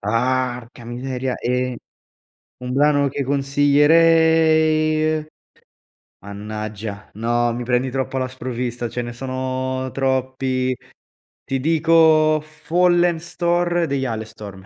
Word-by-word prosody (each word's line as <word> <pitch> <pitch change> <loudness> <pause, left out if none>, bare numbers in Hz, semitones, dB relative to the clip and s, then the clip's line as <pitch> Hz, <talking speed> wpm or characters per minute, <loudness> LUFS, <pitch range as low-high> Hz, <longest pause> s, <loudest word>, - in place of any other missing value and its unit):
Arca 125 +2 -2
miseria. 125 +1 -4
Ehm, 125 0 -1 0.8
un 125 0 -5
brano 145 +1 +3
che 140 - -3
consiglierei 155 +2 +3 0.9
mannaggia, 105 +1 -7
no, 120 +1 0
mi 120 +1 -4
prendi 125 +2 0
troppo 135 0 -2
alla 130 0 -1
sprovvista, 125 -1 -4
ce 120 - -3
ne 120 0 -6
sono 130 +1 -3
troppi. 130 -1 -1 0.7
Ti 135 -1 -2
dico 160 0 +4
Fallen 175 +2 +1
Star 175 0 0
degli 135 -1 -1
Halestorm. 110 -4 -7
130 Hz, 100 wpm, -21 LUFS, 120-155 Hz, 0.9 s, dico